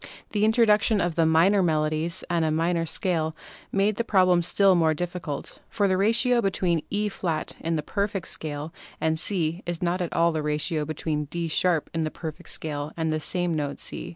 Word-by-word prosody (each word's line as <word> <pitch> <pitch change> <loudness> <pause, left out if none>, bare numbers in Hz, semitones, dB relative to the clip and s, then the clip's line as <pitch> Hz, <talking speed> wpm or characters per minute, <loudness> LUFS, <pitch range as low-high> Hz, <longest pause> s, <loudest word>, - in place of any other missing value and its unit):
The 210 -1 0
introduction 220 -1 +4
of 175 -3 -1
minor 165 +5 +4
melodies 155 0 0
and 170 -1 +1
a 160 - +1
minor 165 +1 0
scale 160 -2 -1 0.4
made 200 +1 +1
the 235 - 0
problem 185 -5 +4
still 195 +3 +4
more 160 -3 +3
difficult, 175 -3 -5
for 205 -2 +1
the 190 - +2
ratio 235 +5 +3
between 185 -5 0
E& 210 +1 0 0.5
in 165 0 -1
the 155 - -2
"perfect" 200 0 -2
scale 150 0 -4 0.3
and 160 0 0
C 170 -2 -1
is 175 0 -3
not 175 +1 0
at 175 - -2
all 170 0 +3
the 160 -1 -2
ratio 150 +1 -1
between 155 0 -2
D 170 +3 -3 0.2
# 165 -4 -1
in 165 -1 0
the 155 - -1
"perfect" 155 -1 -8
scale 150 -1 -4
and 160 -1 0
the 155 - -1
same 175 +2 0
note 145 -2 -3
C. - - -5
170 Hz, 185 wpm, -25 LUFS, 155-190 Hz, 0.5 s, introduction